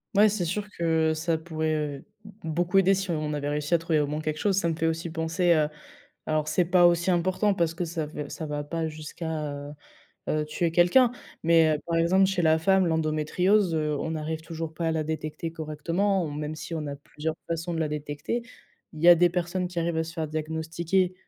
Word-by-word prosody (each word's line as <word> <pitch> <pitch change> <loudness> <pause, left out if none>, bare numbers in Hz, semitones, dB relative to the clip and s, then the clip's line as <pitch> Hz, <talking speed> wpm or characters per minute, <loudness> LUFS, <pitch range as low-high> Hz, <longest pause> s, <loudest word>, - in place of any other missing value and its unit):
Ouais, 210 +2 +6
c'est 200 -4 -1
sûr 200 +5 -2
que 160 -1 +2
ça 160 +1 0
pourrait, 160 -1 -2
heu, 145 -2 -3 0.4
beaucoup 175 +3 0
aider 195 0 +5
si 190 -1 -2
on 155 -2 -2
avait 145 -1 -2
réussi 150 +2 -2
à - - +6
trouver 165 -1 0
au 145 - +1
moins 150 +2 -3
quelque 155 0 -2
chose. 200 -2 +2
Ça 170 -4 +2
me 165 - -1
fait 165 0 0
aussi 165 +1 -2
penser 165 +2 0
à 155 -3 +3 0.6
alors 155 -1 0
c'est 180 +3 +2
pas 175 +1 +5
aussi 175 +1 +3
important 185 +4 +2
parce 170 -3 +1
que 170 +1 -3
ça 160 -2 -3
fait 150 0 -5
v - - -11
ça 160 - -5
va 145 -1 -3
pas 165 +2 -2
jusqu'à, 155 -1 -5
heu 145 0 -7 0.6
heu, 155 0 0
tuer 165 +2 -1
quelqu'un. 180 +9 +5 0.3
Mais 160 -2 +4
par 170 -1 0
exemple, 180 +4 +4
chez 190 -2 0
la 160 -1 +4
femme 190 +1 +3
l'endométriose, 165 +4 +2
heu, 150 -1 0
on 160 - -3
n'arrive 160 0 -3
toujours 165 -1 -6
pas 165 +1 -2
à - - +2
la 160 -1 0
détecter 155 +1 -4
correctement 165 +5 -1
hom 150 -2 -4
même 150 +1 -4
si 160 - -7
on 155 -2 -3
a 140 - -4
plusieurs 150 +2 -5
façons 165 +1 -3
de 165 - -2
la 160 - +1
détecter, 150 +9 -3 0.5
il 155 - -9
y - - +6
a - - +12
des 175 +1 +4
personnes 180 +1 -2
qui 175 -1 -4
arrivent 170 0 -1
à 160 - +1
se 165 +1 -8
faire 160 -2 -3
diagnostiquer, 160 +4 -1
160 Hz, 225 wpm, -27 LUFS, 155-175 Hz, 0.6 s, a